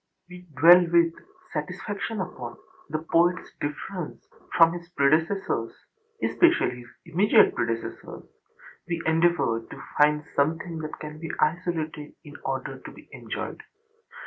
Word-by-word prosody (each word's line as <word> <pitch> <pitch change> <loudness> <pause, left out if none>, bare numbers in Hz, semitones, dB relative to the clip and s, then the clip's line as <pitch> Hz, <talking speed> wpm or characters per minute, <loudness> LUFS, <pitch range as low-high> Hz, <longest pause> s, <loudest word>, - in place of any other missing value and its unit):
We 180 0 -12
dwell 175 +3 +8
with 170 -1 +4 0.4
satisfaction 195 +6 -4
upon 120 -9 -7 0.3
the 155 - -1 0.2
poetâs 175 +2 +3
difference 155 +4 -5 0.3
from 165 0 +7
his 175 0 -8
predecessors, 165 +5 +1 0.5
especially 345 - +3
his 120 - -12 0.2
immediate 185 +5 +4
predecessors; 115 -1 -4 0.6
we 170 -2 -2
endeavour 160 -8 +2
to - - -11 0.2
find 150 0 +4
something 160 +3 0
that 155 -1 -6
can 150 0 -7
be 165 0 -6
isolated 160 -2 -1
in 145 - -12
order - - -3
to - - -10
be - - -16
enjoyed. - - -6
165 Hz, 120 wpm, -26 LUFS, 150-175 Hz, 0.6 s, dwell